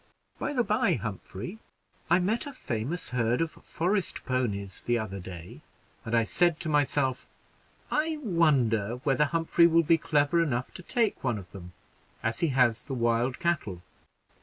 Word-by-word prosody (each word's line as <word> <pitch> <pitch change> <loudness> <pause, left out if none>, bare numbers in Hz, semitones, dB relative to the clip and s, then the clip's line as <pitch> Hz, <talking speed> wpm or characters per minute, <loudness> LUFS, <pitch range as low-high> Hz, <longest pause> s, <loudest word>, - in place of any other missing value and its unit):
By - - -2
the 250 -3 +2
by 230 +2 +2
Humphrey, 110 - -6 0.5
I 175 - +6
met 205 +9 0
a 285 - -7
famous 130 - -4
herd 120 -1 +1
of 165 -1 0
forest 185 +2 -2
ponies 105 -7 -2
the 120 0 +1
other 100 -3 -4
day, 90 -2 -9 0.4
and 115 +1 0
I 115 - +4
said 170 +7 +2
to 165 - -3
myself, 145 -3 +1 0.6
'I 310 +1 +1
wonder 130 - +2
whether 150 0 +3
Humphrey 165 +2 +3
will 165 0 +4
be 165 +1 +4
clever 150 +2 +2
enough 130 -6 -1
to - - -8
take 225 +3 0
one 120 -4 0
of 90 -3 -10
them, 90 -2 -10 0.5
as 115 0 -1
he 170 - +2
has 125 -5 +2
the 135 - -4
wild 120 +1 +1
cattle?' 105 - -1
135 Hz, 160 wpm, -28 LUFS, 115-170 Hz, 0.6 s, I